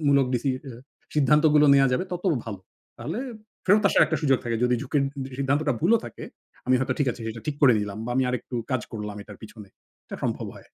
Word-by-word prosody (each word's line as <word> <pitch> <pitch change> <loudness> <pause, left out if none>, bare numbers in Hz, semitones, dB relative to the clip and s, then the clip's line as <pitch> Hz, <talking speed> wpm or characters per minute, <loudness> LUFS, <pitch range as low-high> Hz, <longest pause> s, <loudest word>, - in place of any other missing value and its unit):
মূলক 140 -2 +4
ডিসি 125 +3 0 0.2
আ - - -8 0.4
সিদ্ধান্তগুলো 150 +1 +4
নেওয়া 135 -1 +5
যাবে 125 - 0
তত 180 +1 -5 0.2
ভালো। 100 -4 -6 0.4
তাহলে - - -4 0.5
ফেরত 205 +2 +4
আসার - - +5
একটা - - -1
সুযোগ 135 -3 +3
থাকে। 115 -1 -1
যদি 125 - +3
ঝুঁকির 140 +1 0 0.2
সি 130 - -10
সিদ্ধান্তটা 140 +2 +1
ভুলও 220 +8 +4
থাকে, - - -8 0.4
আমি 130 - +4
হয়তো 130 - -1
ঠিক 145 - +2
আছে 120 - -13
এটা 115 +1 -8
ঠিক 150 -2 -2
করে 130 - +8
নিলাম 105 0 -5
বা - - -4
আমি 130 - +3
আরেকটু 125 0 -4 0.2
কাজ 130 -3 0
করলাম 105 -2 -5
এটার 105 0 -13
পিছনে। 105 -2 -11 0.4
এটা - - -7
সম্ভব - - -2
হয়। - - -14
135 Hz, 210 wpm, -25 LUFS, 115-150 Hz, 0.5 s, করে